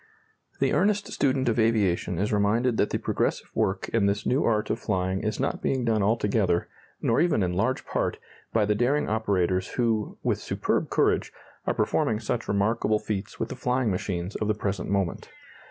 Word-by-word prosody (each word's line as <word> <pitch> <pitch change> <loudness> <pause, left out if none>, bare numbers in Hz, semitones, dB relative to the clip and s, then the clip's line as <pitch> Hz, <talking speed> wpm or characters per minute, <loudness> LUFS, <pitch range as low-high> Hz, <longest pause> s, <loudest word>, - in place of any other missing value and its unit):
The - - +2
earnest 205 +1 +1
student 130 -2 +1
of 115 0 +1
aviation 100 -6 +1
is 105 +4 0
reminded 110 +4 +2
that - - +2
the - - -1
progressive - - -1
work 95 0 0
in 110 -3 +2
this 100 +1 -1
new 130 +4 +2
art 105 -2 +1
of - - -1
flying 95 -3 -1
is 110 -1 -2
not - - -1
being 130 -2 0
done 110 -2 +2
altogether, 100 -4 +1 0.4
nor 115 +6 +3
even 165 - +2
in 90 -1 0
large 115 +8 0
part, - - -1 0.3
by 110 -2 +2
the 105 - +2
daring 125 +7 +1
operators 95 -4 0
who, 115 -4 0
with - - +1
superb - - -1
courage, - - +1 0.4
are - - +1
performing 105 - +1
such 115 +1 -3
remarkable 105 +2 +1
feats 105 -1 -5
with - - -2
the 130 - -5
flying 125 -2 0
machines 90 0 -3
of 105 - -1
the 105 - +1
present 100 -3 -3
moment. 95 -3 -1
105 Hz, 185 wpm, -26 LUFS, 100-115 Hz, 0.4 s, nor